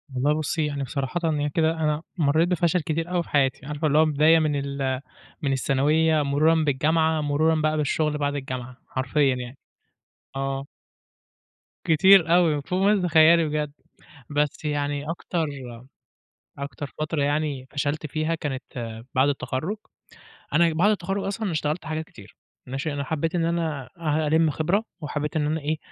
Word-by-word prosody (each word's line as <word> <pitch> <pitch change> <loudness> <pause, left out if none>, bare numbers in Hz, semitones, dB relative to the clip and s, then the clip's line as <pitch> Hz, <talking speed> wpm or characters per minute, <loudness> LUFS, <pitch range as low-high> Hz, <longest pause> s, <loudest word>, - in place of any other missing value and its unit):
والله 145 +4 +2
بُصي 155 +1 -1
يعني 145 -2 -3
ب 135 - -5
صراحةً 140 +6 -3 0.2
ي 145 - 0
كده 160 +2 +2
أنا 155 -1 -1 0.2
مرّيت 160 +2 +3
بفشل 175 0 +1
كتير 165 +3 -3
أوي 175 -1 +1
في - - -17
حياتي، 135 -2 +1
عارفة 150 +1 -2
اللي 150 +1 +2
هو 160 - +6
بداية 155 +2 +4
من 150 -2 +1
ال 140 -2 -2 0.4
من 140 - 0
الثانويّة، 150 +4 +2
مرورًا 150 +4 +3
بالجامعة، 155 +3 +2
مرورًا 150 +2 +2
بقى 155 0 +1
بالشغل 150 0 0
بعد 145 0 -1
الجامعة، 130 -2 -5
حرفيًا 135 0 +1
يعني، 125 +1 -7 0.8
آه. 135 0 -2 1.2
كتير 170 +1 +6
أوي، 160 -5 +3
فوق 180 +1 -1
ما 205 -1 +4
تتخيّلي 165 -1 +5
بجد، 150 -1 -2 0.6
بس 145 +1 -1
يعني 145 0 -2
أكتر 165 -1 -2 1.1
أكتر 140 0 -6
فترة 155 -1 -1
يعني 145 -2 -1
فشلت 145 +2 -2
فيها 155 +2 -1
كانت 145 -5 -4 0.5
بعد 130 +2 +4
التخرُّج، 145 +7 -2 0.8
أنا 170 -1 +4
بعد 175 +6 +3
التخرّج 195 0 -2
أصلًا 200 0 -2
اشتغلت 155 +1 -2
حاجات 160 0 -3
كتير، 100 -10 -15 0.3
ماشي 135 +4 -3
أنا 140 0 -2
حبّيت 160 +4 -2
إن 165 -2 +1
أنا 165 -4 -1
آآ، 155 -1 0
هالِم 160 +1 +3
خِبرة، 175 +8 0 0.2
وحبّيت 150 0 -3
إن 155 -2 +1
أنا 155 +2 0
إيه، 155 +2 -1
150 Hz, 155 wpm, -25 LUFS, 145-160 Hz, 1.2 s, هو